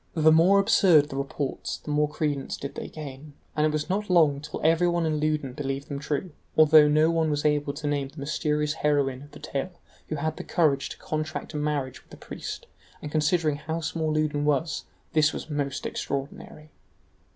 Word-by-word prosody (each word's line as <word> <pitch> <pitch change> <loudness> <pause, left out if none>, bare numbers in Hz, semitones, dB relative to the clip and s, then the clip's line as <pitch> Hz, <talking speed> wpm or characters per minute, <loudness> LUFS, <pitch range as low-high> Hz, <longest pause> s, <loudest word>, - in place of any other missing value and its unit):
The 155 -1 +5
more 170 +5 +6
absurd 185 -7 +5
the 135 - -6
reports, 140 0 -3
the 150 - -7
more 150 0 +2
credence 145 -3 -2
did 140 - -6
they - - -6
gain, 145 -1 -9 0.2
and 155 0 +3
it - - 0
was 150 0 -2
not 200 +3 -2
long 155 -6 +4
till 150 0 -6
everyone 170 +1 +3
in 155 -1 0
Loudun 150 -4 -1
believed 135 0 -4
them 140 -1 -4
true, 150 +4 -3 0.3
although 155 -1 +7
no 155 +2 +4
one 165 -1 +1
was 145 0 -1
able 145 -1 +2
to 150 +1 -7
name 145 -2 0
the 140 - -18
mysterious 150 +1 -1
heroine 140 -4 0
of 145 - -12
the - - -10
tale 150 +3 -4 0.3
who 155 - -3
had 145 - -5
had 155 0 -1
the - - -5
courage 145 -5 +1
to - - -8
contract 155 +1 -4
a - - -3
marriage 145 -3 -2
with - - -33
a - - -11
priest; - - -7 0.3
and 150 - -7
considering 155 -1 +1
how 160 +2 -4
small 160 0 -2
Loudun 155 -1 0
was, 150 +2 0 0.3
this 155 0 +4
was 155 - -6
most 145 -2 -2
extraordinary. 145 +2 -5
150 Hz, 200 wpm, -26 LUFS, 145-155 Hz, 0.3 s, although